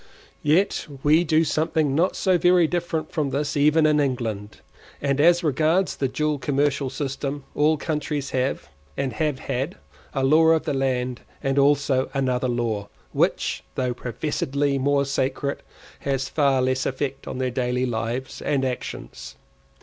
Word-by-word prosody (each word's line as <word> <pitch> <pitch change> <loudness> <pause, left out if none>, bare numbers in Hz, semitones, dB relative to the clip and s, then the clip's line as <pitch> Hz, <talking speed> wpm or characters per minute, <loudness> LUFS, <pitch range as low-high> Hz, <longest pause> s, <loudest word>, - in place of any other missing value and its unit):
Yet 160 +7 +2 0.2
we 155 +3 +5
do 160 -1 +3
something 155 -1 0
not 170 +6 +2
so 185 -3 +2
very 175 0 +5
different 165 -2 -2
from 150 -3 -1
this 140 +1 -2
even 150 +2 +4
in 150 -1 +4
England, 115 -7 -2 0.4
and 140 0 +1
as 175 +2 +5
regards 160 +5 +2
the 135 - 0
dual 150 +2 -1
commercial 140 0 0
system, 140 +1 -4
all 155 +1 +3
countries 150 -3 -3
have, 130 +1 -1 0.3
and 135 -3 -1
have 150 +3 -1
had, 135 +6 -3 0.4
a 135 - 0
law 155 +4 +5
of 160 -1 +4
the - - -2
land, 130 -2 -1 0.2
and 135 0 +1
also 140 -2 +2
another 130 -2 0
law, 115 -4 -2 0.2
which, - - 0
though 125 -1 0
professedly 140 +3 -1
more 140 +1 +2
sacred, 140 +1 -1 0.4
has 135 -1 -1
far 140 -4 +2
less 130 0 0
effect 135 0 -3
on - - -5
their 130 -1 -1
daily 125 0 0
life 120 +2 -3
and 140 -2 +1
actions. 125 -1 -6
140 Hz, 150 wpm, -24 LUFS, 130-150 Hz, 0.4 s, we